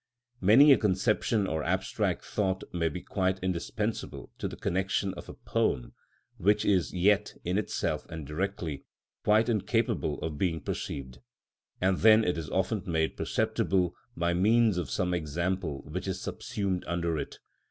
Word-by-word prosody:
Many 130 +10 +8
a - - +3
conception 105 +1 +1
or 80 -4 -2
abstract - - -1
thought 95 -3 -1
may 85 -2 +1
be 90 +3 -7
quite 95 -1 0
indispensable 90 -2 -3
to - - -2
the - - -7
connection 95 +1 -1
of - - -10
a - - -8
poem, - - -1 0.4
which 105 +3 +2
is 95 -4 +2
yet, 100 +3 +2
in 90 +4 0
itself 105 - -2
and 80 -2 -6
directly, 85 -1 -3 0.4
quite 110 +2 +4
incapable 110 -5 0
of 75 -2 -4
being 85 -4 0
perceived; 65 -3 -5 0.6
and 95 0 +2
then 110 +1 +7
it 90 - +1
is 80 -4 -5
often - - 0
made 80 -2 0
perceptible 90 -3 0 0.2
by 85 +1 +1
means 105 +2 +3
of 80 -7 -4
some 90 +8 0
example 85 -1 -2
which 90 +6 -5
is 95 - -2
subsumed 95 -3 -3
under 85 -2 -1
it. - - -6
90 Hz, 150 wpm, -29 LUFS, 85-100 Hz, 0.6 s, Many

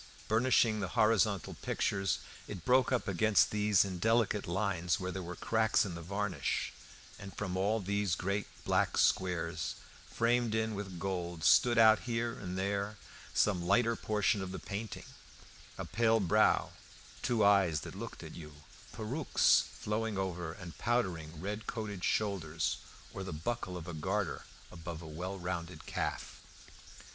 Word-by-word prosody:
Burnishing 115 -1 +3
the 95 - -1
horizontal 110 -4 +3
pictures, 95 -2 -1 0.3
it 85 - -7
broke 130 0 +4
up 125 -4 0
against 105 +3 +3
these 105 -2 +3
in 95 -2 -5
delicate 110 0 +2
lines 90 -2 0
where 95 0 -3
there 95 - -4
were 90 0 -6
cracks 110 +2 +2
in 95 - -4
the 85 - -6
varnish, 100 +2 -2 0.5
and 100 0 -9
from 95 -3 -3
all 100 +4 +1
these 100 -3 0
great 100 +6 -2 0.2
black - - +2
squares 85 -3 +1 0.3
framed 115 -1 +1
in 110 0 0
with 100 -3 -5
gold 85 -3 -3
stood 120 -1 +5
out 110 -2 +7
here 115 -1 -2
and 90 -1 -6
there 100 +2 -1 0.4
some 95 -4 +3
lighter 115 +6 +3
portion 105 -2 +1
of 95 -1 -5
the 95 - -5
painting 105 +2 -6 0.7
a - - -4
pale 115 +1 +2
brow, 105 +2 +3 0.5
two 115 -4 +2
eyes 95 -7 +4
that - - -8
looked - - -7
at - - -9
you, 75 -3 -11 0.3
perukes 125 +8 +2
flowing 110 0 -2
over 90 -4 -2
and 85 -1 -10
powdering 85 -10 -1
red 105 +5 -4
coated 105 -5 -4
shoulders, 85 -7 0 0.4
or 95 - -5
the 95 - -5
buckle 90 +3 -3
of 85 0 -8
a 85 - -5
garter 95 +5 -2 0.3
above 85 -1 -7
a - - -8
well 90 +5 -5
rounded 90 -1 -5
calf. - - -4
100 Hz, 155 wpm, -33 LUFS, 90-110 Hz, 0.7 s, out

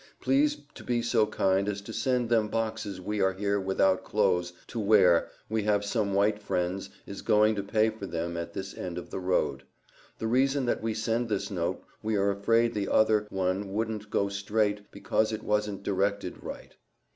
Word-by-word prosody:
Please 290 +2 +2 0.2
to - - -11
be 120 -1 0
so 110 -2 +3
kind 95 -1 +1
as 100 -1 -3
to 110 +3 -9
send 125 -1 +1
them 110 -2 +2
boxes 110 -3 -3
we 105 +3 -2
are 95 0 +3
here 100 +1 0
without 95 0 +2
close 90 -4 +1
to 115 - -5
ware 100 -5 +5 0.2
we 110 0 0
have 105 -1 +1
some 100 -2 0
white 105 +1 +2
frendes 95 0 -2 0.2
is 100 - -7
goin 105 +1 +4
to 100 - -2
pay 110 +2 +2
for 105 -3 -7
them 85 0 -3
at 85 0 -4
this 95 0 -5
end 90 -1 -5
of 90 - -7
the - - -3
road. 90 -7 0 0.6
The - - -4
reason 135 +3 +2
that 120 - 0
we 110 0 -2
send 115 +2 -1
this 105 -2 -2
note - - -2 0.2
we 110 0 -1
are 100 0 +2
afraid 115 +4 +2
the 100 -2 -2
outher 110 -1 +3
one 95 +1 -1
woudent 110 0 -3
go 100 - +1
strait 105 +1 -1
because 110 0 0
it 110 0 -4
wasent 105 -2 -1
derected 100 +1 -1
wright. - - -9
105 Hz, 190 wpm, -28 LUFS, 95-110 Hz, 0.6 s, ware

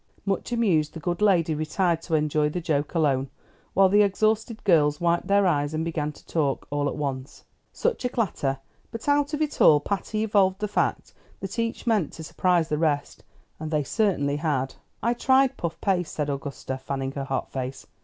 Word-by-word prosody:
Much 195 +4 -2
amused, 185 -11 +1
the - - -5
good 175 +3 -3
lady 175 -6 +3
retired 160 +2 0
to 165 - -1
enjoy 150 0 +1
the 180 - -3
joke 150 -2 -1
alone, 140 -4 +1 0.5
while 195 0 +6
the 205 +2 +4
exhausted 215 +2 +1
girls 150 -5 +3
wiped 170 0 +1
their 200 0 +4
eyes 145 -3 +1
and 160 +1 -1
began 155 -3 -2
to - - -18
talk, 145 -5 -1
all 145 0 0
at - - -5
once. 135 -2 -5 0.3
Such 480 - -1
a 250 - +1
clatter! 170 - -1 0.3
but 230 - -8
out 290 +1 +2
of 305 - 0
it 300 - -4
all 150 - +7
Patty 205 +6 -2
evolved 195 -3 +3
the 210 +1 -2
fact 190 -5 -1 0.3
that 195 +4 -5
each 230 0 -2
meant 215 -9 +1
to 160 - -8
surprise 175 0 +1
the 150 - 0
rest, 150 -3 -1 0.4
and 155 0 -5
they 150 -2 +1
certainly 145 - 0
had. 145 -4 -1 0.3
"I 235 +2 +2
tried 265 +2 +3
puff 165 -1 -4
paste," 180 -4 0
said 150 -1 -1
Augusta, 140 -1 -5
fanning 135 0 -3
her 140 0 -4
hot 135 -1 -3
face. 130 0 -5
165 Hz, 195 wpm, -25 LUFS, 145-205 Hz, 0.5 s, all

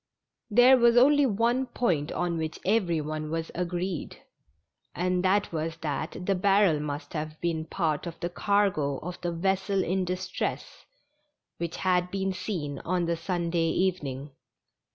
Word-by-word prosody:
There 245 +4 +7
Avas 235 0 +5
only 285 +2 +6
one 240 +4 +1
point 175 -12 0
on 175 -2 -1
which 160 0 -4
every 185 -5 +2
one 155 0 -4
was 165 0 -3
agreed, 180 -1 -3 0.8
and 180 +1 0
that 200 +2 +2
was 160 +1 -3
that 155 +4 -4
the 195 - +2
barrel 195 -3 +3
must 145 0 -5
have 155 -1 -4
been 165 -2 -1
part 160 -1 -1
of 165 - -7
the 175 - -3
cargo 185 -9 +1
of 180 +1 -6
the 175 -1 -1
vessel 190 +3 0
in 185 +2 0
distress 185 +1 -4 0.7
which 170 0 -4
had 180 -1 +1
been 195 0 -1
seen 160 -7 -4
on 180 0 -1
the 170 0 0
Sunday 170 -1 -1
evening. 150 -7 -1
180 Hz, 150 wpm, -27 LUFS, 160-195 Hz, 0.8 s, There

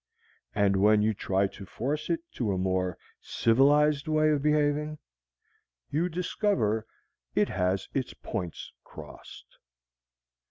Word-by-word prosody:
And 100 -1 +3
when 105 +2 +4
you 110 +1 +2
try 95 -1 0
to 100 +1 -7
force 145 +10 -3
it 170 -1 0
to 115 -5 -2
a 95 - -1
more 95 -1 -1 0.2
civilized 145 +5 +3
way 155 0 +3
of 145 -2 +1
behaving, 150 0 +1 0.9
you 165 +5 +1
discover 160 - 0 0.5
it - - +2
has 95 +1 -1
its 130 -2 -2
points 90 -7 -6
crossed. - - -13
125 Hz, 120 wpm, -28 LUFS, 100-150 Hz, 0.9 s, when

